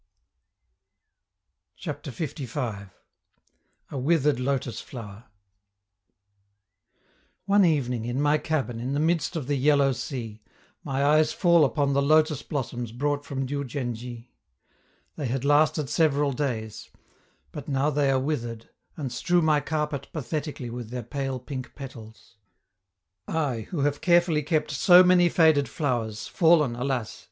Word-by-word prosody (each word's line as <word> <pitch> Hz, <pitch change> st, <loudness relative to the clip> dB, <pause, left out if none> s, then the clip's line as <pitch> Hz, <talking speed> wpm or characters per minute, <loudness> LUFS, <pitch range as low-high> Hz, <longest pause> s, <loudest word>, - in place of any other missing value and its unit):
CHAPTER -, -, -6 dB
LV. 125 Hz, -, -5 dB, 1.0 s
A -, -, -4 dB
WITHERED 150 Hz, -1 st, +2 dB
LOTUS 130 Hz, -2 st, -2 dB
FLOWER 110 Hz, -3 st, -10 dB, 2.2 s
One 200 Hz, +1 st, +4 dB
evening, 125 Hz, -9 st, +1 dB
in 120 Hz, +2 st, -2 dB
my 145 Hz, +1 st, +3 dB
cabin, 135 Hz, -8 st, -2 dB
in 125 Hz, +3 st, -3 dB
the -, -, 0 dB
midst 165 Hz, +1 st, 0 dB
of 155 Hz, -5 st, -3 dB
the 145 Hz, +1 st, 0 dB
Yellow 140 Hz, 0 st, +3 dB
Sea, 115 Hz, -4 st, -6 dB, 0.4 s
my 135 Hz, +1 st, -1 dB
eyes 155 Hz, +1 st, +4 dB
fall 170 Hz, -3 st, +4 dB
upon 140 Hz, 0 st, +1 dB
the 140 Hz, -, +2 dB
lotus 155 Hz, 0 st, +3 dB
blossoms 120 Hz, -5 st, -4 dB
brought 145 Hz, +4 st, -1 dB
from 135 Hz, -2 st, -3 dB
Diou 140 Hz, +2 st, -3 dB
djen 125 Hz, -2 st, -3 dB
dji; 120 Hz, +1 st, -9 dB, 0.9 s
they 145 Hz, -, -2 dB
had 130 Hz, +2 st, -2 dB
lasted 145 Hz, 0 st, +3 dB
several 145 Hz, -1 st, +2 dB
days; 120 Hz, -6 st, -4 dB, 0.6 s
but 145 Hz, -, -8 dB
now 140 Hz, +1 st, +1 dB
they 145 Hz, -1 st, +1 dB
are 135 Hz, -1 st, +3 dB
withered, 120 Hz, -5 st, -4 dB, 0.3 s
and 140 Hz, -5 st, -4 dB
strew 175 Hz, +7 st, +1 dB
my 155 Hz, -2 st, +3 dB
carpet 150 Hz, -2 st, -3 dB
pathetically 145 Hz, -3 st, -4 dB
with 120 Hz, -2 st, -6 dB
their 125 Hz, 0 st, -5 dB
pale 135 Hz, +2 st, -3 dB
pink 130 Hz, 0 st, -7 dB
petals. 115 Hz, -5 st, -11 dB, 0.9 s
I, 140 Hz, -9 st, -2 dB
who 165 Hz, -6 st, -2 dB
have 145 Hz, +1 st, 0 dB
carefully 175 Hz, -3 st, +3 dB
kept 155 Hz, 0 st, -1 dB
so 175 Hz, +6 st, +7 dB
many 180 Hz, -1 st, +5 dB
faded 160 Hz, -4 st, +3 dB
flowers, 115 Hz, -7 st, -2 dB
fallen, 160 Hz, -8 st, +3 dB
alas! 125 Hz, -2 st, -3 dB
140 Hz, 135 wpm, -26 LUFS, 125-150 Hz, 2.2 s, so